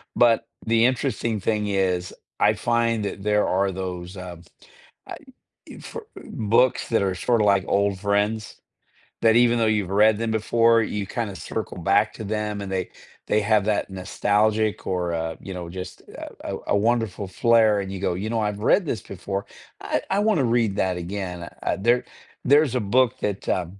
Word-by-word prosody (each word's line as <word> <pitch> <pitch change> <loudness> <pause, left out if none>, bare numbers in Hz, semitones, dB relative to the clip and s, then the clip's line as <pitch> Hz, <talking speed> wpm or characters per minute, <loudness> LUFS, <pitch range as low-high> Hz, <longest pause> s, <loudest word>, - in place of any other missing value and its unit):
but 120 -2 +4 0.2
the 115 +1 +3
interesting 120 -4 0
thing 105 +1 -1
is 95 -3 0 0.3
I - - +4
find 115 -2 0
that 100 - -5
there 105 0 +2
are 95 +1 +1
those, 90 0 -6
uh, 90 -2 -8 0.7
I - - -7 0.5
e - - -11
for - - -9
uh, - - -12
books 115 +4 +1
that 115 - +3
are 95 -1 0
sorta 110 +4 +1
like 100 -2 +3
old 100 -1 +1
friends. 105 +1 -1 0.7
That 115 0 +5
even 120 0 +4
though 115 - +3
you've 105 -4 0
read 105 +2 +4
them 115 0 -2
before, 115 +1 +3
you 105 -1 -3
kinda 105 -3 -4
circle - - -5
back - - +2
to - - -7
them 105 0 -3
and 100 -1 -6
they 95 -1 -2 0.4
they 105 - +2
have 105 -1 +2
that 105 -1 0
nostalgic 105 +3 0
or, 90 -2 -1
uh, 80 0 -3
you 95 - -7
know, 90 -2 -6
just 90 +1 -8
a - - -9
a - - -4
a 100 - +3
wonderful 110 -3 0
flare 110 +1 +3
and 95 - -6
you 95 - -5
go, 90 -2 0
"You 100 +4 -4
know, 115 0 0
I've 105 -1 -2
read 175 - +3
this 125 - -3
before. 100 +1 -5 0.4
I - - -1
I 195 - +1
wanna 205 - +2
read 115 -4 +1
that 95 -1 +1
again." 90 -1 -5
A - - 0
there 120 +4 +2 0.4
there's 140 -1 +4
a - - +2
book 120 +3 +2
that, 100 -2 -3
uh, 90 - +1
105 Hz, 185 wpm, -24 LUFS, 95-115 Hz, 0.7 s, That